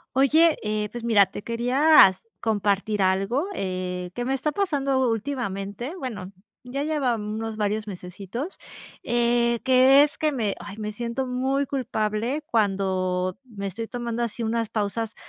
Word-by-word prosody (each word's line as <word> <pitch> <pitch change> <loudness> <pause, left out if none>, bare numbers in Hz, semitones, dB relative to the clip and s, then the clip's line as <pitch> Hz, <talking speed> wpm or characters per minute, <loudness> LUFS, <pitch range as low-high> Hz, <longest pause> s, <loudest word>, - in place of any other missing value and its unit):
Oye, 310 +5 +5
eh, 210 -1 -2
pues 240 -1 -6
mira, 210 -4 +5
te 200 - -8
quería 250 +6 +5
s 185 - -9 0.2
compartir 205 -1 0
algo, 195 - +1
eh, 180 -1 -3
que 245 - -3
me 265 - 0
está 270 +3 -1
pasando 275 -8 +1
últimamente, 225 - -3
bueno, 205 - -6 0.3
ya 260 +3 -3
lleva, 290 -6 0
mm, 210 0 -4
unos 225 0 -4
varios 210 0 -1
mesesitos, 195 - -6 0.5
eh, 235 0 +2
que 260 +2 +6
es 295 0 -1
que 305 -1 0
me 220 -6 -1
ay, 205 -1 -8
me 215 -1 -4
siento 235 +4 -3
muy 265 +3 0
culpable 245 0 -2
cuando 190 -5 0
me 205 -5 -6
estoy 225 +4 -5
tomando 240 -1 -4
así 235 0 -3
unas 230 0 0
pausas 220 +1 -2
230 Hz, 155 wpm, -25 LUFS, 205-260 Hz, 0.5 s, que